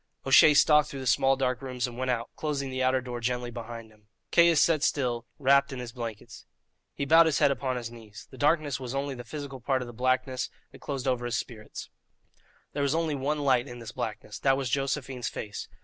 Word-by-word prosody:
O'Shea 150 - +7
stalked 150 0 +5
through 140 - -6
the 130 - -6
small 135 +2 +3
dark 130 -1 -1
rooms 125 -2 -3
and 120 -2 -7
went 130 +1 -3
out, 120 -2 -1
closing 140 -3 -3
the 130 0 -2
outer 130 0 +2
door 120 -1 -5
gently 125 +1 -2
behind 115 -1 -8
him. 105 -1 -25 0.2
Caius 170 -2 +5
sat 160 -1 +3
still, 120 -5 0
wrapped 140 0 +4
in 130 - -5
his 125 -2 -6
blankets. 115 -2 -8 0.5
He 140 - -2
bowed 165 +3 +6
his 155 - +1
head 140 - +4
upon 130 -1 -2
his 120 -2 -5
knees. 110 -3 -12
The 130 - -12
darkness 145 -3 +2
was 130 0 -5
only 140 0 -2
the 120 -1 -8
physical 140 -2 -7
part 130 +1 0
of - - -9
the 120 - -9
blackness 130 +1 0 0.2
that - - -15
closed 135 -2 -4
over 125 -2 0
his 120 -1 -1
spirit. 110 -3 -7 0.9
There 145 - -2
was 140 +2 +1
only 165 -2 0
one 145 +2 -1
light 130 -2 +3
in 120 - -8
this 115 -2 -8
blackness 105 -1 -5
that 135 -1 +3
was 130 -3 -3
Josephine's 135 -2 -2
face. 105 -1 -6
130 Hz, 220 wpm, -28 LUFS, 120-140 Hz, 0.9 s, O'Shea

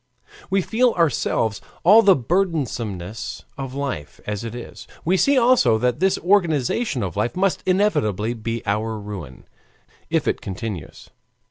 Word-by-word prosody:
We 195 -1 +2
feel 240 +4 +2
ourselves 120 - 0 0.2
all 210 +6 +8
the 200 -4 +6
burdensomeness 115 - -2
of 135 -1 -6
life 140 - -4
as 105 0 -3
it 115 0 -6
is; 120 - -9 0.2
we 180 +3 +3
see 275 +8 +3
also 245 - +4
that 125 +1 0
this 190 0 +2
organization 170 - +1
of 90 -4 -4
life 105 +4 -1
must 190 0 +1
inevitably 120 - +1
be 115 0 -4
our 110 +2 -1
ruin, 100 -11 -8 0.7
if - - 0
it - - 0
continues. 95 -2 -7
125 Hz, 140 wpm, -22 LUFS, -, 0.7 s, all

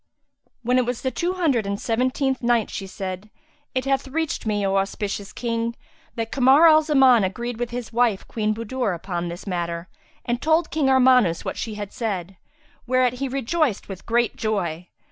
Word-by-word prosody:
When 250 +2 +3
it 250 - +1
was 245 -1 -3
the 260 - 0
Two 350 +5 -1
Hundred 285 - +1
and 200 0 -2
Seventeenth 255 +3 0
Night, 235 -3 +1
She 195 - -5
said, 190 +1 -6 0.5
It 255 0 0
hath 270 0 0
reached 310 -3 -2
me, 205 -2 0
O 195 0 +1
auspicious 200 +1 -3
King, 230 -1 -2 0.4
that 225 -1 -3
Kamar 275 +4 +6
al 310 -1 +7
Zaman 270 -7 +5
agreed 235 +5 -3
with 240 -1 -2
his 240 -1 -6
wife, 235 -4 +1
Queen 215 -2 -1
Budur, 230 -2 -2
upon 175 0 -4
this 170 +2 -7
matter 170 -2 -3 0.4
and 240 0 -1
told 320 +1 +2
King 295 -4 +1
Armanus 250 -9 +4
what - - -3
she 220 -2 -4
had 205 -1 -6
said; 195 -5 -3 0.5
whereat 250 -1 +2
he 275 - 0
rejoiced 270 - -1
with 190 -2 -9
great 235 +1 +1
joy. 180 -6 -2
235 Hz, 180 wpm, -23 LUFS, 200-260 Hz, 0.5 s, al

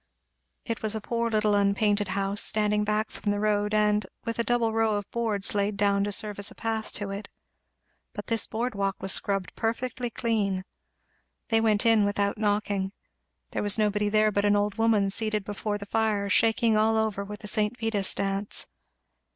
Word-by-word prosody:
It 230 - -3
was 220 0 -1
a - - -2
poor 230 +2 -2
little 215 -1 +2
unpainted 205 0 +2
house, 195 +1 -1
standing 210 -1 +2
back 215 +1 -1
from 205 - -4
the 205 - -1
road, 210 0 +1
and 210 0 +2 0.2
with 230 0 -3
a - - +3
double 235 -2 +1
row 225 -1 +2
of 205 -1 -3
boards 220 -4 0
laid 200 0 0
down 200 -1 +2
to 205 - -2
serve 205 0 0
as 200 - +1
a - - -14
path 225 -1 -3
to 200 -1 -4
it. 200 +1 -6 0.8
But - - -6
this 230 -2 +1
board 240 +2 -2
walk 195 -1 -1
was 195 - 0
scrubbed 195 -2 0
perfectly 245 +2 -2
clean. 205 -5 -1 0.8
They 225 -2 +3
went 215 -1 +2
in 225 -2 +5
without 200 0 0
knocking. 205 -2 0 0.6
There - - -2
was 205 0 +1
nobody 210 -1 +1
there 215 0 +3
but 200 0 0
an 205 0 +3
old 205 +1 0
woman 215 -3 +3
seated 215 0 +1
before 205 0 -3
the 200 - -8
fire 210 -1 0
shaking 225 +1 +3
all 220 +1 +3
over 215 -2 -1
with 210 +1 -8
the 210 - -7
St. 210 +3 +1
Vitus's 215 -4 0
Dance. 200 +1 -1
210 Hz, 190 wpm, -27 LUFS, 200-220 Hz, 0.8 s, in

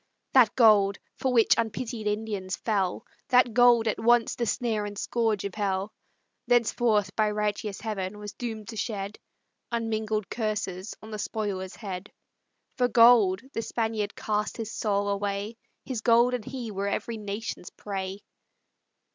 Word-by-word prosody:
That 245 -5 +6
gold, 210 -5 +5 0.2
for 260 - -1
which 230 -3 +5
unpitied 225 0 -3
Indians 210 -3 -2
fell, 195 -5 -1 0.2
That 250 -2 +4
gold, 240 -1 +5
at 215 - 0
once 235 +1 +4
the 235 - -2
snare 220 -1 0
and 205 0 -6
scourge 220 -2 0
of 200 - -4
hell, 200 0 -2 0.5
Thenceforth 225 -4 +2
by 215 -1 +2
righteous 210 -1 -2
Heaven 205 -3 -3
was 205 -1 -7
doom'd 220 -3 -6
to 230 - -6
shed 205 -2 -4 0.5
Unmingled 220 -3 -1
curses 210 -4 -3
on 220 - -10
the 215 - -5
spoiler's 200 -3 -3
head; 195 -3 -7 0.7
For 250 -2 +3
gold 230 -5 +6
the 225 - -1
Spaniard 220 -3 -2
cast 210 0 -2
his 220 -2 -4
soul 205 -2 0
away, 200 +2 -2 0.3
His 250 -5 -3
gold 235 +1 +4
and 240 -4 -3
he 245 -4 -5
were 200 0 -2
every 225 +3 -2
nation's 205 -2 -5
prey. 195 -1 -5
215 Hz, 145 wpm, -27 LUFS, 200-230 Hz, 0.7 s, That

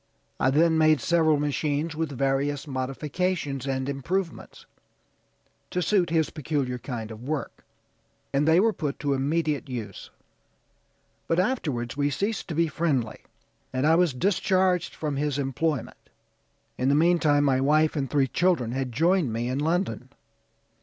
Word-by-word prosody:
I - - +3
then 160 +3 +3
made 155 -2 +4
several 160 -3 +3
machines 150 +2 -1
with 160 -1 -2
various 135 +2 -1
modifications 140 +2 -2
and 130 -1 -1
improvements, 165 +6 -4 1.0
to 180 - -2
suit 180 0 +2
his 160 -1 +1
peculiar 140 -4 -2
kind 115 -3 -6
of 110 0 -9
work, 145 +3 -4 0.7
and 140 +2 +2
they 160 +2 +5
were 220 +2 +3
put 150 -6 -3
to 145 -1 +1
immediate 145 +1 -1
use; 110 -6 -6 1.2
but 165 - +1
afterwards 150 - -1
we 145 0 +1
ceased 200 +8 -2
to 160 - -4
be 165 +1 +2
friendly, 140 -7 -1 0.5
and 130 +2 -1
I 160 - +5
was 175 -1 +3
discharged 185 +1 +1
from 150 -3 -3
his 145 -1 -1
employment. 140 0 -2 0.7
In 130 +1 +2
the 140 - +4
meantime 155 -3 +3
my 135 -2 +2
wife 155 +3 +3
and 135 -3 -2
three 140 -2 +2
children 140 -5 +1
had 130 0 -2
joined 165 +1 +2
me 115 +2 -2
in 130 +2 -1
London. 160 -4 -1
145 Hz, 145 wpm, -26 LUFS, 135-165 Hz, 1.2 s, they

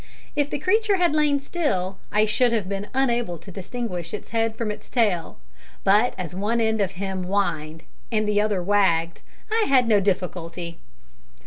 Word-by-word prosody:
If 290 -1 +1
the - - -2
creature 415 +7 +2
had 350 -4 +2
lain 300 -2 +3
still, 235 - -2
I 210 +1 +4
should 240 +3 +2
have 215 -5 0
been 200 +1 -3
unable 240 -8 0
to 170 +5 -12
distinguish 190 -2 -4
its - - -9
head 225 -1 0
from 225 -2 -2
its 210 - -9
tail; 200 - 0 0.5
but 210 +5 +4
as 180 -3 -5
one 210 +5 0
end 220 -1 +1
of 195 -1 0
him 190 0 -3
whined, 165 -5 -1 0.3
and 215 -1 +1
the 210 0 +3
other 205 -4 0
wagged, 170 -4 +2 0.3
I 445 0 +3
had 255 -3 +4
no 215 -3 +5
difficulty. 180 -3 -2
205 Hz, 175 wpm, -24 LUFS, 185-240 Hz, 0.5 s, no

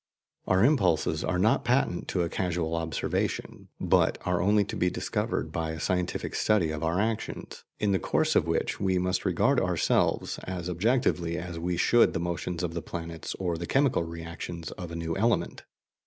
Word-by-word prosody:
Our 95 +3 +4
impulses 90 - +2
are 80 +2 0
not 105 +5 +3
patent 120 -7 +1
to 90 - 0
a - - 0
casual 85 -3 -1
observation, 80 -1 -2
but - - +3
are 90 -1 +1
only 105 +2 +4
to - - -5
be 90 - +2
discovered - - -2
by 80 -1 -2
a 80 - -6
scientific 90 +3 -1
study 100 -7 +2
of 75 -1 -4
our 85 +3 +1
actions, 110 +1 -3 0.2
in 105 -1 +1
the 95 - +2
course - - +1
of - - +3
which - - -1
we 95 -2 +1
must 90 0 0
regard - - +3
ourselves - - +1
as 90 -2 -4
objectively 90 -4 +1
as 85 -1 -5
we 90 +1 -1
should 120 +6 +4
the - - -1
motions 85 +1 -3
of 85 -2 -2
the 85 - -3
planets 85 -1 -6
or 85 -3 -2
the 85 - -4
chemical 135 -6 +2
reactions 85 0 -6
of 90 -4 -7
a - - -5
new 80 0 -3
element. 115 +4 0
90 Hz, 185 wpm, -28 LUFS, 85-95 Hz, 0.2 s, Our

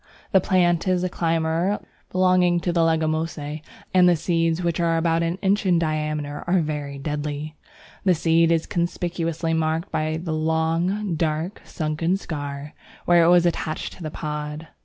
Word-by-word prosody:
The 190 - +5
plant 175 -1 +2
is 185 -1 +2
a 185 - 0
climber 165 +3 0 0.3
belonging 180 -1 +3
to 175 - 0
the 170 - +1
Leguminosæ, 155 -2 -1 0.3
and 180 -1 +6
the 175 - +4
seeds, 165 +1 0
which 170 -1 0
are 165 -1 +2
about 165 0 +1
an 170 +2 -1
inch 200 +2 +2
in 180 -3 +3
diameter, 150 -2 -2
are 180 +1 +3
very 145 -2 -4
deadly. 150 +1 -4 0.5
The 185 -2 +4
seed 165 +1 +3
is 165 -1 +2
conspicuously 170 -1 -2
marked 160 +3 -1
by 155 0 -1
the 165 -1 -4
long, 165 +5 0
dark, 160 +3 -2
sunken 160 +3 -1
scar, 145 -4 -6 0.3
where 175 -1 +5
it - - +4
was 175 0 +5
attached 160 -2 -2
to - - -15
the 155 - -4
pod. 150 0 -5
165 Hz, 160 wpm, -23 LUFS, 155-175 Hz, 0.5 s, and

